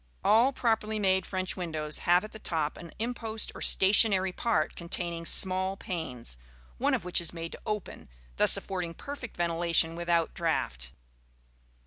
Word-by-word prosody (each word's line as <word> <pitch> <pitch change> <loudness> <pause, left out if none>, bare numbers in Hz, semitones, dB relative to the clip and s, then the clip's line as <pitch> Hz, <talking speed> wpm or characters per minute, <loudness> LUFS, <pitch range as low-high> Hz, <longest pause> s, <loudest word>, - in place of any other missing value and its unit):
All 235 +5 +4
properly 220 -4 0
made 190 -2 +1
French 185 -1 -3
windows 155 -4 -3
have 175 +2 +5
at 215 - -8
the 220 - -11
top 155 -6 -2
an 170 -2 -11
impost 225 -1 -3
or - - -10
stationary 190 -1 +4
part 230 +5 -1
containing 170 -1 -4
small 190 +1 +4
panes, 125 - -6 0.4
one - - +2
of - - -5
which 180 -1 +2
is 170 - 0
made 165 -1 -6
to - - -10
open, 210 - -5 0.3
thus - - +6
affording 180 -3 -5
perfect 280 - -8
ventilation 170 -1 +1
without 170 -1 0
draught. - - -2
180 Hz, 150 wpm, -29 LUFS, 165-210 Hz, 0.4 s, thus